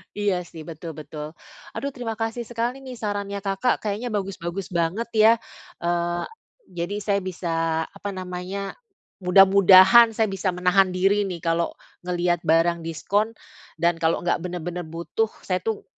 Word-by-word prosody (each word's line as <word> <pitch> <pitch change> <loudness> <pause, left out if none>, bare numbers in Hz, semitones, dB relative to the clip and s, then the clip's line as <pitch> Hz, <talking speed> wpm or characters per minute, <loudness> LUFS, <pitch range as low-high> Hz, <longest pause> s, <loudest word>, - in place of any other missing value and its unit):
Iya 205 -2 +1
sih, 160 -1 -10
betul 160 0 -8
betul. 150 +1 -8 0.4
Aduh, 280 - -3
terima 245 -4 -5
kasih 225 +1 -3
sekali 240 +3 -2
nih 260 -2 -9
sarannya 205 -2 -3
Kakak, 195 +5 0
kayaknya 215 +3 -2
bagus-bagus 195 -2 -4
banget 175 +7 -1
ya. 220 0 +7 0.5
Eee, 175 0 0 0.5
jadi 175 +3 -3
saya 200 -1 +1
bisa 165 -3 -1
apa 200 0 -7
namanya, 185 +2 -5 0.4
mudah-mudahan 195 +4 +7
saya 220 -1 +1
bisa 190 -1 -1
menahan 180 +1 +3
diri 195 +3 +2
nih 180 -4 -5
kalau 165 0 0 0.3
ngelihat 175 -1 0
barang 165 +2 +3
diskon. 205 +7 -1 0.4
Dan 170 0 +1
kalau 160 0 +1
nggak 175 - +1
bener-bener 175 0 -5
butuh, 170 +7 -2 0.2
saya 185 -1 -1
tuh 220 +4 -3
185 Hz, 145 wpm, -24 LUFS, 170-205 Hz, 0.5 s, ya